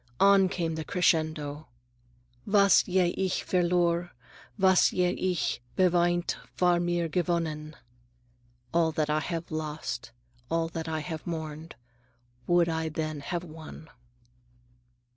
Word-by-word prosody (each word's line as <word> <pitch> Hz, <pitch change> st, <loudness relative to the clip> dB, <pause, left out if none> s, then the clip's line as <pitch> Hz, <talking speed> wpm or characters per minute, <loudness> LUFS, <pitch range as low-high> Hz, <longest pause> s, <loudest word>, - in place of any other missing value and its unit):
On 195 Hz, -1 st, +6 dB
came 170 Hz, -3 st, -2 dB
the 160 Hz, 0 st, -4 dB
crescendo:— 155 Hz, -4 st, 0 dB, 0.8 s
"Was 200 Hz, -1 st, +6 dB
je 180 Hz, -2 st, +2 dB
ich 190 Hz, -1 st, -1 dB
verlor, 175 Hz, -1 st, +1 dB, 0.5 s
Was 190 Hz, -2 st, +5 dB
je 180 Hz, -1 st, +2 dB
ich 180 Hz, -7 st, -1 dB, 0.2 s
beweint 175 Hz, -1 st, +2 dB, 0.2 s
War' 175 Hz, -1 st, +4 dB
mir 175 Hz, -1 st, 0 dB
gewonnen." 160 Hz, -3 st, -2 dB, 1.0 s
(All 165 Hz, -1 st, +3 dB
that 150 Hz, -1 st, 0 dB
I 155 Hz, -, +2 dB
have 165 Hz, +1 st, -4 dB
lost, 155 Hz, 0 st, -4 dB, 0.4 s
All 165 Hz, 0 st, 0 dB
that 165 Hz, 0 st, -5 dB
I 160 Hz, -1 st, -2 dB
have 160 Hz, 0 st, -6 dB
mourned, 160 Hz, -1 st, -5 dB, 0.7 s
Would 175 Hz, -1 st, +4 dB
I 160 Hz, -1 st, -1 dB
then 155 Hz, -1 st, -3 dB
have 170 Hz, +5 st, -4 dB
won.) 160 Hz, -1 st, -11 dB
170 Hz, 120 wpm, -28 LUFS, 155-180 Hz, 1.0 s, On